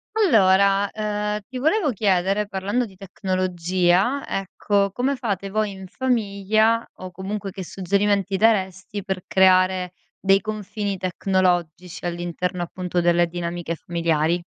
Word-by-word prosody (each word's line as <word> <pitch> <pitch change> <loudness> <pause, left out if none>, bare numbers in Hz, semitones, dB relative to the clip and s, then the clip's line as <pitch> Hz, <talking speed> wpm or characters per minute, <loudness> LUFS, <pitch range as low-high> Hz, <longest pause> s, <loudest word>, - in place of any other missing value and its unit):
Allora, 200 - +4
ehm, 210 -1 -2
ti 255 - -6
volevo 315 +6 +2
chiedere, 195 -1 +1
parlando 205 +5 -1
di 195 -4 -14
tecnologia, 185 +4 0
ecco: 200 +1 0
come 255 +7 0
fate 200 -6 -3
voi 215 +1 0
in 190 -1 -9
famiglia 220 -1 +1
o 185 - -7
comunque 195 +3 -5
che 190 0 -7
suggerimenti 195 +2 0
daresti, 195 -2 +1
per 190 -2 -4
creare 185 -1 +3 0.3
dei 195 0 +4
confini 210 -1 -4
tecnologici 180 -2 -1
all'interno, 175 +1 -3
appunto, 180 0 -2
delle 175 0 +3
dinamiche 170 0 -4
familiari? 170 0 0
190 Hz, 120 wpm, -23 LUFS, 180-210 Hz, 0.3 s, Allora